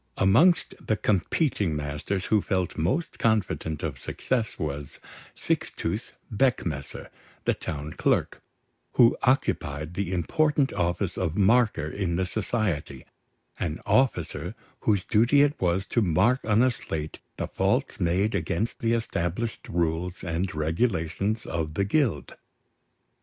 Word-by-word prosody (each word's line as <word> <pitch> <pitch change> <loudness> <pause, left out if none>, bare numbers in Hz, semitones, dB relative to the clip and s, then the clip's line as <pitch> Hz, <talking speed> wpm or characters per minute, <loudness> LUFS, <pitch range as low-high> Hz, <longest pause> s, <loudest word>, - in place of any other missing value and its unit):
Amongst 135 - +4
the 110 - +2
competing 100 - +1
masters 75 +6 -3
who 105 -2 +3
felt 95 -3 -1
most 100 - -1
confident 105 -8 0
of - - -3
success 115 -4 -2
was 75 -4 -5 0.4
Sixtus - - -2 0.2
Beckmesser, 90 - -1 0.4
the - - +3
town 75 0 -5
clerk, - - 0 0.5
who 120 -1 +6
occupied 80 - 0
the 95 -1 -2
important 140 - +1
office 85 +1 -1
of 90 -3 -1
marker 110 - +3
in 85 +1 -2
the 95 +2 +1
society, 95 - -2 0.5
an 80 -2 -2
officer 110 - +1 0.2
whose 100 -4 +1
duty 120 +7 +4
it 145 0 +3
was 90 +1 +1
to 120 - +1
mark 100 +8 +2
on 110 +2 +4
a 130 - +4
slate 80 -9 -5 0.2
the - - -2
faults - - 0
made 95 +6 +1
against 85 +7 -1
the 115 0 +1
established 110 -1 -2
rules 85 +1 -1
and 90 0 -2
regulations 95 +5 0
of 80 -2 -3
the 100 - +1
Guild. 110 - 0
95 Hz, 125 wpm, -26 LUFS, 80-115 Hz, 0.5 s, who